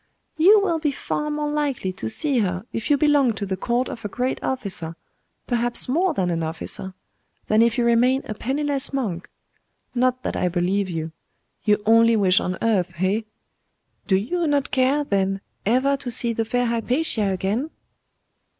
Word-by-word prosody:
'You 385 +7 +6
will 340 -5 0
be 305 -1 0
far 295 +2 -3
more 295 0 -2
likely 280 -10 -1
to 110 -11 -5
see 280 - 0
her 185 -1 -1
if 225 - -3
you 290 - +4
belong 285 -4 +3
to 200 -1 -4
the 190 -1 -2
court 240 +6 -1
of 230 - -8
a - - -2
great 250 +6 -2
officer 185 -10 -2 0.5
perhaps 240 -1 -1
more 330 +6 +1
than 180 -2 0
an 165 -1 -1
officer 165 +3 -4 0.5
than 215 +1 +3
if 235 +1 +3
you 240 - +2
remain 245 +3 +3
a - - -4
penniless 275 +5 +1
monk. 200 -11 -3 0.6
Not 255 0 +1
that - - -3
I - - 0
believe 185 +3 0
you. 160 -2 -4 0.5
Your 210 -1 +4
only 230 +1 +5
wish 190 -3 +4
on 185 +1 -3
earth, 185 -6 +1
eh? 190 +5 +1 0.9
Do 190 - +3
you 320 - 0
not 285 -1 0
care, 270 +3 +2
then, 195 -5 0 0.3
ever 260 +5 +3
to 265 - -6
see 235 0 +1
the 225 0 -1
fair 245 +2 0
Hypatia 235 -1 0
again? 200 - -1
235 Hz, 175 wpm, -23 LUFS, 195-275 Hz, 0.9 s, You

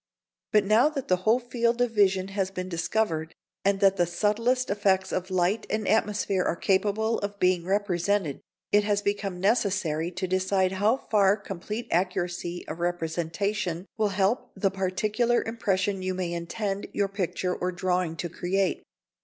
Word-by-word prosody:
But 210 -1 +4
now 220 +8 +5
that 280 -4 -5
the 185 - +5
whole 215 +6 +3
field 240 -1 0
of 245 -1 +2
vision 195 -3 +2
has 195 -1 -1
been 185 -1 -5
discovered, 165 -2 -1 0.3
and 195 0 +2
that 195 0 +4
the 175 -1 +2
subtlest 225 +8 +1
effects 195 -2 +1
of 185 +1 -2
light 185 +4 +1
and 215 -1 -1
atmosphere 210 -3 +1
are - - 0
capable 205 +5 +1
of 200 0 -5
being 180 -2 +2
represented, 195 -4 0 0.3
it 205 0 +5
has 205 0 0
become 200 -3 -2
necessary 190 -6 +1
to 185 +2 -2
decide 185 0 +1
how 205 +6 +2
far 205 -5 +3
complete 210 +3 -6
accuracy 175 -1 -1
of 155 +2 -6
representation 175 +2 -2
will 215 -2 +1
help 205 +6 0
the 195 0 +1
particular 210 +5 0
impression 200 -4 -1
you 185 0 -2
may 180 -2 -2
intend 195 +4 -3
your 200 - +1
picture 185 -2 -2
or 180 - -2
drawing 180 -2 -1
to 175 - -3
create. 185 +3 -1
195 Hz, 160 wpm, -27 LUFS, 180-210 Hz, 0.3 s, now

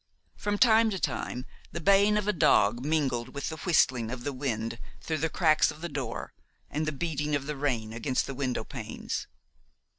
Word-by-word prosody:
From 205 0 -1
time 225 -1 +6
to 195 -3 -3
time 125 -5 -2 0.3
the 170 - -4
baying 200 +4 +5
of 210 -1 -1
a 210 - +3
dog 120 - +4
mingled 135 -5 0
with 140 - -2
the 160 - -6
whistling 130 -10 +2
of 125 0 -5
the 145 - -2
wind 115 -4 -3 0.2
through 160 -1 -3
the 160 +2 0
cracks 155 -1 +4
of 155 - -8
the 175 - -3
door 135 -5 -4 0.4
and 155 +1 -1
the - - +1
beating 150 -1 -1
of 140 -1 -2
the 150 +1 -3
rain 120 -6 -1
against 125 +3 0
the 135 - -5
window 130 -2 -2
panes. - - -5
145 Hz, 190 wpm, -29 LUFS, 125-170 Hz, 0.4 s, time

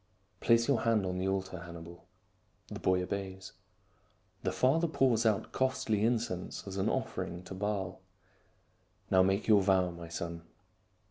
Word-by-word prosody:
" - - -40
Place 115 0 +4
your 140 -4 +2
hand 115 -4 +2
on 90 0 -2
the 95 - -1
altar, 95 -1 -2
Hannibal." 85 0 -10 0.6
The - - -6
boy 90 0 +2
obeys. 95 0 -5 0.9
The - - -1
father 160 +7 +2
pours 125 -7 +2
out 105 -3 0
costly 130 -5 0
incense 110 -6 -1
as 95 0 -5
an 95 - +1
offering 85 +1 -3
to 95 - -8
Baal. 95 -1 -3 0.6
" - - -38
Now 95 - +6
make 95 +2 +2
your 105 -3 +6
vow, 95 -2 +3
my 85 -1 -9
son." 85 0 -5
95 Hz, 155 wpm, -32 LUFS, 90-115 Hz, 0.9 s, Now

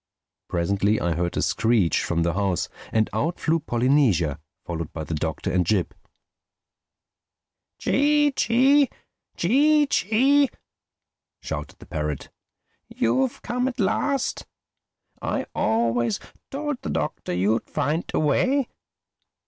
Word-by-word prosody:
Presently 100 +4 +1
I 85 -1 0
heard 85 +2 -2
a - - +1
screech 110 -8 +2
from 85 -1 0
the 85 0 0
house, 95 -2 -1 0.2
and 110 -1 +2
out 165 +4 -1
flew 165 +1 +1
Polynesia, 120 - +2 0.3
followed 85 -3 -4
by 80 - -4
the 80 - -5
Doctor 80 0 -2
and 90 +1 +2
Jip. 90 +1 0 1.8
"Chee 295 +1 +3
Chee!—Chee 275 - +2
Chee!" 270 +4 +3 0.9
shouted 75 -2 -5
the - - -14
parrot. 75 -2 -4 0.6
"You've 125 +3 0
come 250 +1 -1
at 260 -1 -5
last! 265 +7 0 0.7
I - - -2
always 115 +1 +1 0.3
told 290 -1 -3
the - - -5
Doctor - - -3
you'd 100 +6 0
find 150 +3 -1
a - - -1
way. 255 - +2
120 Hz, 115 wpm, -24 LUFS, -, 1.8 s, Chee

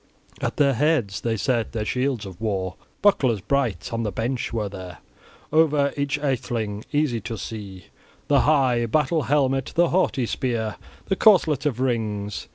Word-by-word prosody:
At - - -2
their 140 -2 +4
heads 125 - +1
they 115 -1 -1
set 115 +2 0
their 110 -2 -2
shields 125 -2 -1
of 95 +1 -10
war, 95 -4 -2 0.3
bucklers 130 - +3
bright; 110 -5 -1
on 115 - -1
the 105 -3 -2
bench 120 +6 -2
were 110 -3 -1
there 95 -4 -8 0.6
over 150 -3 +3
each 140 0 -1
atheling, 115 -7 -2
easy 145 -6 +1
to 115 0 -5
see, 100 -4 -7 0.4
the 140 -1 +4
high 130 -6 +3
battle 155 +5 +1
helmet, 135 -1 +1
the 170 0 +4
haughty 170 -8 +1
spear, 115 -3 -2 0.3
the 195 - 0
corselet 160 - +4
of 125 -5 -2
rings. 110 -5 -2
120 Hz, 160 wpm, -24 LUFS, 105-145 Hz, 0.6 s, their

